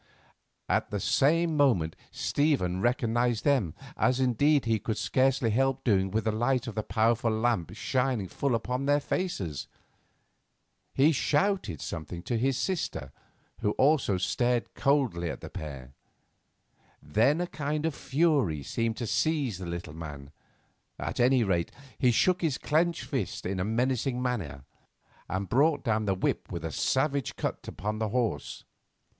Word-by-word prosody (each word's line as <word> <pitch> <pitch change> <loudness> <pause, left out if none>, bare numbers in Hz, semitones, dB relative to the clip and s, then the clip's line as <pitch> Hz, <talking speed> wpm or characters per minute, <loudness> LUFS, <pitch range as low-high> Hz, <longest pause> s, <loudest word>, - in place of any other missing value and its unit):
At - - +1
the 105 - -2
same 160 - +2
moment 110 - +2
Stephen 130 - 0
recognised 120 -1 +1
them, 130 - +2 0.2
as 130 0 +2
indeed 135 +3 +3
he 115 -1 +1
could 110 +2 -3
scarcely 130 -3 +2
help 135 +3 +1
doing 95 -5 +2
with 110 +3 -1
the 110 - +1
light 120 +3 +1
of 115 - -5
the 110 - -1
powerful 115 +1 +1
lamp 110 -5 0
shining 125 -4 0
full 135 +6 -1
upon 125 +4 -2
their 145 0 +4
faces. 105 - -3 1.3
He 145 +4 +5
shouted 150 - 0
something 85 +1 -6
to 115 +3 -1
his 130 +2 +1
sister, 140 - -2 0.5
who 105 - 0
also 135 -8 +3
stared 120 +6 0
coldly 125 - +1
at - - -6
the - - -8
pair. 70 -4 -7 1.1
Then 110 - +2
a 180 - 0
kind 150 -2 -3
of 160 - 0
fury 135 - +1
seemed 115 - -2
to 120 - -3
seize 140 - 0
the 90 - -6
little 85 -3 -5
man; 75 -3 -8 0.7
at - - -4
any 125 0 +4
rate, 90 -5 0 0.3
he 125 - +4
shook 180 +10 +3
his 155 -6 0
clenched 165 +3 +1
fist 130 -9 -3
in 95 +1 -2
a - - +1
menacing 125 +3 0
fashion, 85 - -3 0.7
and 95 +1 -2
brought 145 - +2
down 110 -3 +1
the 95 -2 +1
whip 95 - -2
with 85 -1 -4
a 80 - -3
savage 135 - 0
cut - - -4
upon 105 +3 -4
the 110 -1 -1
horse. 115 - -2
120 Hz, 150 wpm, -28 LUFS, 95-140 Hz, 1.3 s, He